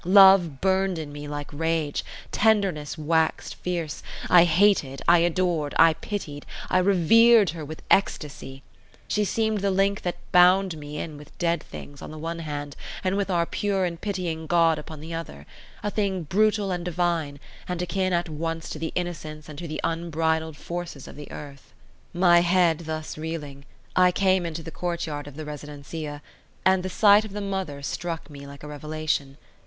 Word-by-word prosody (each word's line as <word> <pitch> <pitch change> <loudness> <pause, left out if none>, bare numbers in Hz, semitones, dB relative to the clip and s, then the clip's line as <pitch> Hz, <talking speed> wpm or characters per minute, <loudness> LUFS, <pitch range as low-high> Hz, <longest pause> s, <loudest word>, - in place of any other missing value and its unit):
Love 190 -5 +7
burned 190 -1 +2
in 155 -2 -5
me 145 0 -7
like 145 0 -6
rage; 160 -1 -1 0.3
tenderness 195 -9 +1
waxed 160 +1 0
fierce; 170 -4 -4 0.3
I 175 -1 +8
hated, 170 -6 +2
I 175 0 +7
adored, 170 -3 0
I 165 0 +7
pitied, 155 -6 -6 0.3
I 185 - +4
revered 200 +3 +5
her 165 -2 -7
with 155 +2 -8
ecstasy. 140 -7 0 0.4
She 210 - +1
seemed 220 +1 0
the 200 +1 +1
link 195 +1 +1
that 175 - -3
bound 180 0 +5
me 150 -1 -8
in 155 -1 -5
with 150 - -15
dead 170 -1 +1
things 140 -1 -10
on - - -7
the 155 - -8
one 165 +2 -4
hand, 145 -3 -5 0.3
and 185 0 +1
with 200 -1 -1
our 170 -2 +2
pure 195 +1 0
and 170 -1 -4
pitying 175 -6 -3
God 165 -2 +3
upon 150 0 -9
the 165 +2 -7
other: 120 - -6 0.4
a 210 - -1
thing 195 -4 -1
brutal 205 +4 +2
and 175 -1 -2
divine, 170 -4 -1 0.3
and 180 -1 -3
akin 185 +2 -1
at 175 -1 +1
once 165 +1 -4
to 155 - -5
the 160 0 -3
innocence 155 -4 -4
and 150 -1 -9
to 170 - -5
the 155 0 -5
unbridled 160 -1 -1
forces 170 -4 -6
of - - -10
the 145 0 -10
earth. 140 -2 -10 0.4
My 175 -1 +5
head 175 -2 +3
thus 155 -1 -5
reeling, 150 -3 -6 0.3
I 180 0 +5
came 185 -1 +2
into 165 0 -5
the 165 - -8
courtyard 160 -4 -3
of 145 - -10
the 155 0 -6
residencia, 150 0 -7 0.4
and 190 0 +4
the 185 - -4
sight 205 +2 +6
of 215 -2 -8
the 210 - -3
mother 190 -8 -4
struck 165 +1 -4
me 140 -1 -10
like 140 0 -12
a - - -7
revelation. 150 -1 -3
165 Hz, 180 wpm, -25 LUFS, 150-185 Hz, 0.4 s, I